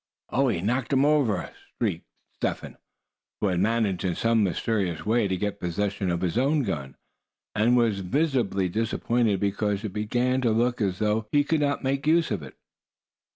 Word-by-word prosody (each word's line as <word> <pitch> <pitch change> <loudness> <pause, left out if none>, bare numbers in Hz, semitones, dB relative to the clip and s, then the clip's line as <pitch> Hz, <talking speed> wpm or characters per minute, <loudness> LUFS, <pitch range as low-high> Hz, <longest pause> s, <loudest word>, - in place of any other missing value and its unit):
"Oh! 135 +1 +2
he 100 -9 0
knocked 120 +7 -1
him 135 +1 +4
over!" 135 - +1 0.3
shrieked - - -2 0.3
Step - - -2
Hen, - - -10 0.6
who 105 - +1
had 90 -2 0
managed 105 -2 +1
in 90 -3 0
some 115 -1 +2
mysterious 95 -3 -1
way 110 0 +2
to 95 -1 -1
get 105 +2 -3
possession 95 +2 -2
of 85 0 -1
his 90 +5 0
own 140 +2 +2
gun, 70 - -4 0.6
and 120 +4 +3
was 115 -4 +2
visibly 105 - 0
disappointed 115 +1 0
because 100 +1 -1
it 105 -4 -4
began 120 +5 0
to 120 - +2
look 120 +2 +1
as 95 -3 0
though 105 +1 0
he 145 0 +4
could 155 +2 +1
not 140 -1 0
make 135 +2 -1
use 160 -3 +3
of 105 - -1
it. 65 -3 -11
110 Hz, 180 wpm, -26 LUFS, 95-125 Hz, 0.6 s, him